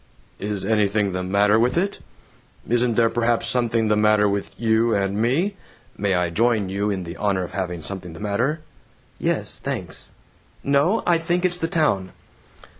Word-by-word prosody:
"Is 100 -1 -3
anything 105 -1 +1
the 90 0 -3
matter 100 +3 +3
with 125 +6 +1
it? 195 +3 -1 0.7
Isn't 120 0 +1
there 115 0 +4
perhaps 115 +1 0
something 115 -2 +1
the 105 - +3
matter 105 0 +4
with 100 0 -2
you 115 0 +2
and 100 0 0
me? 170 - +1 0.4
(May 100 -2 0
I 90 -1 0
join 110 0 +1
you 100 +2 -1
in 95 -3 -2
the 85 -1 -7
honor 100 -3 0
of 90 - -7
having 90 -4 -4
something 90 -1 -6
the 80 - -10
matter?)" 115 +10 -1 0.6
"(Yes, - - -1
thanks.) - - -5 0.5
No, 145 +10 +2
I 170 -2 +3
think 175 +2 0
it's 180 -1 +1
the 165 - -1
town." 125 - 0
105 Hz, 170 wpm, -22 LUFS, 100-120 Hz, 0.7 s, there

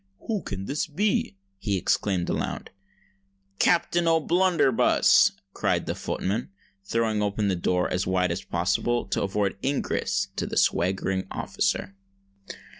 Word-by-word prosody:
"Who 215 -4 -2
can 95 0 -5
this 145 +7 -2
be?" 160 - 0 0.2
he 100 -1 -1
exclaimed 90 0 0
aloud. - - -3 0.9
"Captain 175 0 +2
O'Blunderbuss!" 165 -4 +4 0.2
cried - - 0
the - - -2
footman, 105 +6 -3 0.3
throwing 110 +1 0
open 105 0 0
the 95 - +1
door 90 +1 0
as 90 +1 -2
wide 90 -1 +1
as 85 - -3
possible 100 +7 0
to - - 0
afford 100 0 -1
ingress 100 -8 -1
to - - -1
the - - -4
swaggering 95 +1 +1
officer. 95 - -2
100 Hz, 125 wpm, -26 LUFS, 95-140 Hz, 0.9 s, O'Blunderbuss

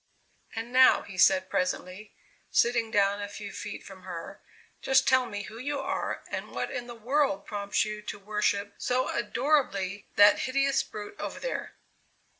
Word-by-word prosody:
"And 230 +2 -5
now," 260 0 +6
he 195 - -10
said 185 0 +4
presently, 185 +3 -3 0.3
sitting 235 -1 +2
down 200 -1 +2
a 205 - -3
few 205 0 -7
feet 205 +2 -7
from 190 -1 -11
her, 180 +1 -8 0.4
"just 265 0 +3
tell 260 -2 +4
me 205 -2 -5
who 225 +1 -9
you 285 +2 -2
are - - -3
and - - -4
what - - -3
in 245 -1 -4
the 240 - -8
world 245 -2 0
prompts 205 0 0
you 215 0 -5
to 210 - -6
worship, 205 0 -1
so 255 +1 0
adorably, 205 -9 0
that 205 0 +7
hideous 275 +1 +2
brute 210 - -9
over - - -5
there?" - - -4
210 Hz, 165 wpm, -28 LUFS, 200-250 Hz, 0.4 s, that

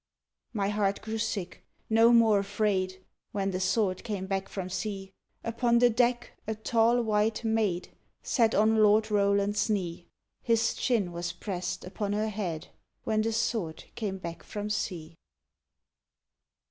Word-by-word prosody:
_ - - -62 0.5
My 200 -4 0
heart 205 -1 0
grew 220 0 -3
sick, 205 -5 -3 0.2
no 225 +1 +5
more 225 -3 +5
afraid, 195 -2 -1 0.3
When 195 -1 0
the 185 - -2
Sword 190 0 +1
came 200 -4 -3
back 195 0 -2
from 190 -2 -4
sea; 195 +1 -4 0.3
Upon 235 +1 +2
the 245 0 +5
deck 240 +1 +1 0.2
a 220 - -1
tall 230 +2 +2
white 215 +1 +1
maid 220 -6 0 0.3
Sat 230 -3 +2
on 220 +2 +4
Lord 215 0 +4
Roland's 200 +1 +2
knee; 175 -4 -2 0.3
His 230 -1 +2
chin 215 -8 0
was 175 0 -3
press'd 180 0 -4
upon 205 +2 -3
her 215 +1 0
head, 185 -7 -4 0.4
_When 215 -1 +1
the 225 +1 0
Sword 215 -7 -1
came 200 -4 -3
back 170 -2 -7
from 210 0 -5
sea! 170 -6 -3
210 Hz, 145 wpm, -29 LUFS, 190-220 Hz, 0.5 s, no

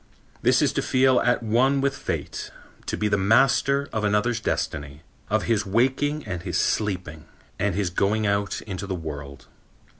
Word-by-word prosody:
This - - +4
is - - +2
to - - 0
feel 130 -1 +3
at 120 -1 +1
one 125 +5 +2
with 140 0 0
Fate, - - -4 0.4
to - - -2
be 105 - 0
the 100 -1 +1
master 135 +6 +3
of 110 - -1
another's 105 +3 +1
destiny, 75 -7 -3 0.3
of 110 0 +1
his 110 -3 +1
waking 130 +8 0
and 90 -4 -4
his 90 -2 -2
sleeping 90 -8 -1 0.3
and 100 -3 0
his 95 -3 -1
going 105 +4 +1
out 100 0 -1
into 100 -2 -6
the 95 - -2
world. 75 -4 -7
105 Hz, 170 wpm, -24 LUFS, 90-125 Hz, 0.4 s, This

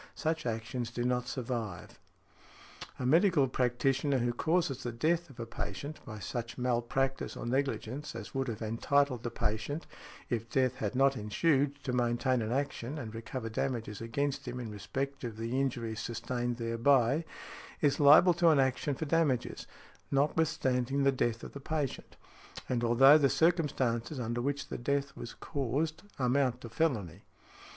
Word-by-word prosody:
Such 160 -4 -1
actions 115 +1 -3
do 120 0 -3
not 125 0 0
survive. 115 - -4 1.0
A 125 - -3
medical 165 0 +4
practitioner 135 +3 +1
who 120 -1 0
causes 160 -1 0
the 120 - -3
death 165 +8 0
of 130 -3 -15
a 115 - -3
patient 140 +5 -6
by 110 -2 -6
such 115 +4 -5
malpractice 125 +2 -1
or - - -5
negligence 135 +2 -2
as - - -7
would 135 -1 -1
have 115 -1 -4
entitled 125 +3 +1
the 120 - -3
patient 110 +7 -2 0.4
(if 115 -1 -2
death 130 0 +1
had 105 0 -2
not 135 +1 +4
ensued) 140 +6 +1
to 125 - -2
maintain 120 +1 +1
an 110 +1 -2
action 140 0 -2
and 115 -6 -6
recover 115 +1 -5
damages 115 -2 -3
against 135 +4 -2
him 125 +1 -4
in 115 -3 -5
respect 135 +7 -4
of 115 -3 -5
the 115 +4 -1
injury 120 -4 -2
sustained 120 +1 -3
thereby, 120 +5 +3 0.6
is 145 -2 +2
liable 150 +5 +8
to 170 0 +4
an 155 -3 +5
action 135 +2 +1
for 160 - -3
damages, 150 -5 0 0.4
notwithstanding 140 -3 +1
the 140 - +5
death 120 -3 -1
of - - -7
the 140 - -7
patient, 145 -1 -3 0.5
and 120 -2 -1
although 135 +6 +7
the 140 -2 +4
circumstances 145 -6 +1
under 120 0 -2
which 140 +2 -2
the - - -4
death 140 +2 -1
was 120 - -8
caused 145 +3 -2 0.2
amount 130 0 +1
to 115 - -8
felony. 115 - -1
130 Hz, 160 wpm, -31 LUFS, 120-140 Hz, 1.0 s, liable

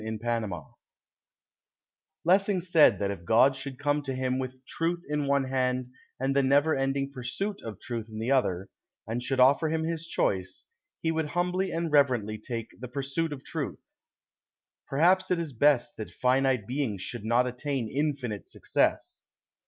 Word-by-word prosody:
THE 110 - -4
GAME 115 -2 -1 1.7
Lessing 195 +2 +3
said 170 -3 +5
that 100 -1 -1
if 95 -4 -7
God 120 +8 +5
should 135 -1 -7
come 145 +1 +1
to 135 -2 -4
him 130 0 -1
with 130 0 -6
truth 170 +4 -2
in 150 -1 -1
one 140 0 +3
hand 130 -1 -1 0.3
and 135 +1 0
the 140 - +5
never 140 +4 +3
ending 135 +1 -1
pursuit 140 +11 -4
of 110 -4 -7
truth 115 -2 -5
in 110 - -8
the 115 +4 -1
other, 95 -9 +1 0.4
and 115 +3 -3
should 130 +1 -1
offer 140 +5 +5
him 160 0 0
his 165 0 -3
choice, 95 - -1 0.4
he 160 - +2
would 160 -1 -1
humbly 180 +2 +1
and 165 -1 -2
reverently 125 -7 +2
take 115 0 -5
the 125 - -6
pursuit 140 +5 -2
of 135 -2 -7
truth. - - -4 1.1
Perhaps 180 +6 +3
it 180 - +2
is 165 -4 -4
best 140 +1 +3
that 110 -5 -5
finite 130 +2 +1
beings 120 -6 -2
should 120 -4 -5
not 120 +3 +3
attain 125 0 -2
infinite 135 -5 -2
success. - - -1
135 Hz, 165 wpm, -28 LUFS, 120-150 Hz, 1.7 s, said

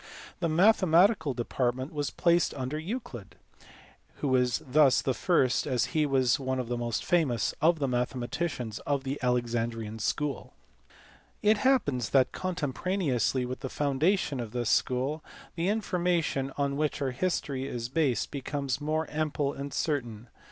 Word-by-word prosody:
The 170 -2 0
mathematical 175 - +4
de 120 -1 -3
partment 130 +3 -1
was 145 -1 -1
placed 170 0 +2
under 135 +3 -3
Euclid, 155 - -6 0.8
who 140 - -2
was 125 -2 +2
thus 140 0 +5
the 130 - 0
first, 135 -5 +2
as 125 -4 +1
he 155 -2 +2
was 130 -2 +2
one 130 -1 -2
of 125 -2 -4
the 120 - 0
most 120 -2 -2
famous, 140 - +1
of 165 +2 +4
the 140 -3 -1
mathematicians 125 0 -2
of 140 -2 -1
the 135 +1 -3
Alexandrian 115 -3 -1
school. 145 +6 -2 0.9
It 210 0 +4
happens 145 - +2
that 130 -2 +3
contemporaneously 155 - -1
with 130 +1 -5
the 135 - -5
foundation 145 +2 0
of 115 -3 -5
this 120 -2 0
school 135 +5 0 0.3
the 175 +2 -1
information 175 -9 0
on 140 -1 0
which 150 0 -1
our 135 -2 -1
history 135 -3 -2
is 120 -3 -4
based 135 -4 0
be 140 - -4
comes 140 -1 -3
more 155 +2 0
ample 150 -2 -1
and 140 +1 -6
certain. 120 -8 -2
140 Hz, 150 wpm, -29 LUFS, 125-160 Hz, 0.9 s, thus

